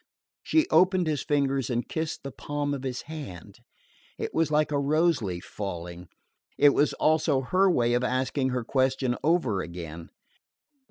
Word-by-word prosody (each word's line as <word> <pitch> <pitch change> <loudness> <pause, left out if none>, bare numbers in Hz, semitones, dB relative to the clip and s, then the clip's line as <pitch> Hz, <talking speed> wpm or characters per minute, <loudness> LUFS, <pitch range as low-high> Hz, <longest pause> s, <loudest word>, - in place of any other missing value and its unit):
She 320 +1 +2
opened 185 -1 +4
his 150 -3 -1
fingers 135 -4 0
and 120 -1 -1
kissed 160 -4 -4
the 140 - -6
palm 145 +3 -3
of 140 - -4
his 130 -2 -4
hand. 145 - -9 0.6
It - - -4
was 165 -1 +1
like 150 0 +1
a 145 - +1
rose 155 +1 +2
leaf 90 -4 -4
falling; 90 -3 -6 0.5
it 145 - +7
was 145 +1 +2
also 155 -3 +2
her 185 +9 +2
way 120 -8 +2
of 120 +1 +1
asking 130 +1 0
her 125 -1 -2
question 130 0 +1
over 140 - +2
again. 85 0 -8
135 Hz, 160 wpm, -27 LUFS, 120-155 Hz, 0.6 s, it